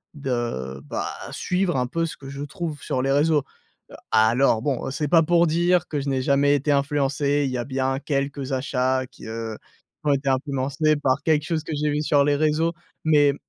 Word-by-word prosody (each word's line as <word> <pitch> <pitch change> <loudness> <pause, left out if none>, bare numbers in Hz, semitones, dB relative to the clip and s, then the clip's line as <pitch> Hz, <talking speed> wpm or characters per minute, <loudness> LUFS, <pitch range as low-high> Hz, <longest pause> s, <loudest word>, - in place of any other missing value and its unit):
de, 120 - -3
bah, 75 - -3 0.2
suivre 180 -1 -1
un 125 - +1
peu 165 +6 -1
ce - - -8
que 135 - -10
je 140 0 -7
trouve 150 0 -5
sur 130 - -1
les 135 - +1
réseaux. 145 +1 +3 0.7
Alors 110 +2 +4
bon, 135 0 -2
c'est 150 +3 -2
pas 165 0 +6
pour 170 +1 +3
dire 175 +2 +2
que 150 - -2
je 140 - -5
n'ai 130 -1 0
jamais 140 +2 +3
été 145 +1 0
influencé, 140 0 +1
il 135 - -2
y 125 - -2
a 120 - -3
bien 135 0 -1
quelques 140 -1 -2
achats 130 0 0
qui, 130 - -13
heu, 110 -1 -5 0.5
qui 150 - 0
ont 145 - +5
été 140 0 0
influencés 140 +3 +1
par 140 -1 0
quelque 155 -2 +2
chose 160 -1 -1
que 160 - -5
j'ai 150 +1 0
vu 150 +1 0
sur 145 -2 +3
les 145 0 +3
réseaux, 155 +2 +2 0.3
mais 145 -2 +5
140 Hz, 205 wpm, -24 LUFS, 130-150 Hz, 0.7 s, pas